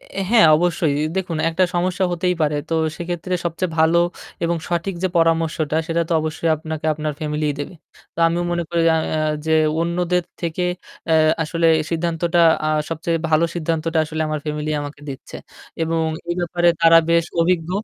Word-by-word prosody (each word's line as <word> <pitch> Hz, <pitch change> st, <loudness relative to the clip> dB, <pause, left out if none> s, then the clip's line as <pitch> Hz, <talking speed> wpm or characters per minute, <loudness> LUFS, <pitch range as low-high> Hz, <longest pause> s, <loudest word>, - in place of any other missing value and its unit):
অ্যা 195 Hz, -, -7 dB
হ্যাঁ, 225 Hz, -7 st, +7 dB
অবশ্যই 165 Hz, -3 st, +1 dB, 0.2 s
দেখুন, 180 Hz, -3 st, -2 dB
একটা 175 Hz, +3 st, +2 dB
সমস্যা 180 Hz, +2 st, 0 dB
হতেই 180 Hz, +1 st, 0 dB
পারে। 150 Hz, -1 st, +1 dB
তো 165 Hz, -, -1 dB, 0.2 s
সেক্ষেত্রে 175 Hz, +1 st, -3 dB
সবচেয়ে 170 Hz, +1 st, -2 dB
ভালো 160 Hz, +2 st, +4 dB, 0.5 s
এবং 170 Hz, +1 st, 0 dB
সঠিক 175 Hz, +2 st, -2 dB
যে 185 Hz, -, +2 dB
পরামর্শটা 165 Hz, -2 st, +1 dB
সেটা 170 Hz, 0 st, 0 dB
তো -, -, -1 dB
অবশ্যই 155 Hz, +1 st, -2 dB
আপনাকে 160 Hz, 0 st, -5 dB
আপনার 150 Hz, 0 st, -3 dB
ফ্যামিলিই 150 Hz, -1 st, -1 dB
দেবে। 145 Hz, -, -6 dB, 0.4 s
তো -, -, -16 dB
আমিও 170 Hz, +1 st, 0 dB
মনে 175 Hz, 0 st, 0 dB
করি 170 Hz, -, +1 dB
আ -, -, +2 dB, 0.2 s
আ -, -, 0 dB, 0.3 s
যে 160 Hz, -, +1 dB, 0.3 s
অন্যদের 175 Hz, +1 st, 0 dB, 0.2 s
থেকে 170 Hz, +1 st, -2 dB, 0.5 s
অ্যা 160 Hz, -, +3 dB, 0.3 s
আসলে 165 Hz, +1 st, 0 dB, 0.2 s
সিদ্ধান্তটা 170 Hz, +1 st, 0 dB, 0.3 s
আ -, -, +1 dB, 0.2 s
সবচেয়ে 165 Hz, +1 st, -2 dB
ভালো 160 Hz, +1 st, +3 dB
সিদ্ধান্তটা 165 Hz, 0 st, -1 dB
আসলে 155 Hz, +1 st, -3 dB
আমার 155 Hz, -1 st, -2 dB
ফ্যামিলি 150 Hz, 0 st, -3 dB
আমাকে 145 Hz, 0 st, -7 dB
দিচ্ছে। 135 Hz, -1 st, -8 dB, 0.5 s
এবং 165 Hz, 0 st, 0 dB, 0.2 s
এই 175 Hz, -, 0 dB
ব্যাপারে 175 Hz, 0 st, +1 dB
তারা 165 Hz, 0 st, +7 dB
বেশ 170 Hz, 0 st, +3 dB, 0.2 s
অভিজ্ঞ। 170 Hz, -1 st, +1 dB
165 Hz, 170 wpm, -20 LUFS, 155-175 Hz, 0.5 s, হ্যাঁ